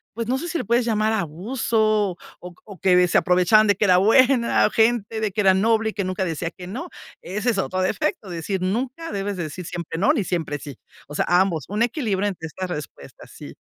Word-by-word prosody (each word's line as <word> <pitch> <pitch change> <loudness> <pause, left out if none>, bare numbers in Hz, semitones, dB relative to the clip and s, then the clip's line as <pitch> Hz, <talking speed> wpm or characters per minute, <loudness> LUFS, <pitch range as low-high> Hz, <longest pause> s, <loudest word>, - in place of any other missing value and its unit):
pues 230 -1 -4
no 260 +2 0
sé 345 - -5
si 340 - -2
lo - - -4
puedes 235 +2 +2
llamar 220 -1 +1
abuso 215 - 0 0.2
oc 180 0 -11
o 200 -3 -12
que 180 -1 +4
se - - +3
aprovechaban 180 +4 +4
de 205 - +3
que 210 - +1
era 180 -2 +5
buena 235 +5 +4
gente, 225 -1 +1
de 215 -2 -1
que 210 - -1
era 190 -2 +5
noble 220 +3 +2
y - - -18
que 200 - -2
nunca 185 0 -2
decía 165 0 -3
que 180 0 -11
no. 255 - -6 0.3
Ese 210 +7 -1
es 200 - -2
otro 185 0 -1
defecto, 190 +1 -1
decir, 180 +3 -3
nunca 255 - -3
debes 200 -1 -3
decir 170 +1 -5
siempre 170 -1 -5
no 200 - +4
ni 210 - 0
siempre 165 -5 -2
sí. 140 -2 -10 0.3
O 145 - -10
sea, - - 0
ambos, 175 -5 +2
un 210 +3 0
equilibrio 220 - -1
entre 180 -5 -5
estas 185 +4 -6
respuestas, 150 -5 -9
sí. - - -11
200 Hz, 220 wpm, -22 LUFS, 180-225 Hz, 0.3 s, era